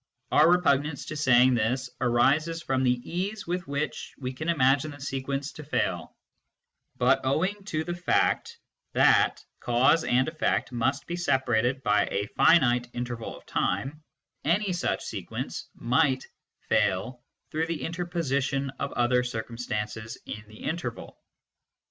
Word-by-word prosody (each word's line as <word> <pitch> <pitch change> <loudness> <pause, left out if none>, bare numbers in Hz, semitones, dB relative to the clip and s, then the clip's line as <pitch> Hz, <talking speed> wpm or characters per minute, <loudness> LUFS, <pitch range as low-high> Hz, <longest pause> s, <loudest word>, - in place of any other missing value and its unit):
Our - - +6
repugnance 150 -4 +2
to 155 - -6
saying 130 -3 +5
this 125 +2 0
arises 145 +7 +2
from 135 -2 0
the 125 -1 +2
ease 195 +5 -3
with 180 0 -3
w 140 +2 0
iicii - - -9
we 130 -1 -4
can 155 +6 -4
imagine 140 -1 +3
the 145 -1 -10
sequence 135 +1 -3
to 150 - -10
fail, 145 - -2 0.8
but - - +4
owing 185 +10 0
to 155 -6 -2
the 175 - -3
fact 175 0 +1 0.4
that - - +4
cause 130 +7 +3
and 130 +1 +2
effect 155 -3 0
must 130 +3 -1
be 175 - -4
separated 130 -5 +1
by 105 -1 +3
a 100 - -1
finite 125 -6 +4
interval 120 -2 -5
of - - -17
time, 135 +12 -1 0.4
any 190 +4 +1
such 175 - -1
sequence - - -5
might 130 +1 +1 0.4
fail 120 +7 0 0.3
through 160 +1 -1
the 165 -2 -3
interposition 140 -6 -1
of 140 - -2
other 125 +1 +2
circumstances 110 -2 -4
in 105 - -7
the 110 0 -13
interval. 160 -8 -5
135 Hz, 140 wpm, -27 LUFS, 125-160 Hz, 0.8 s, Our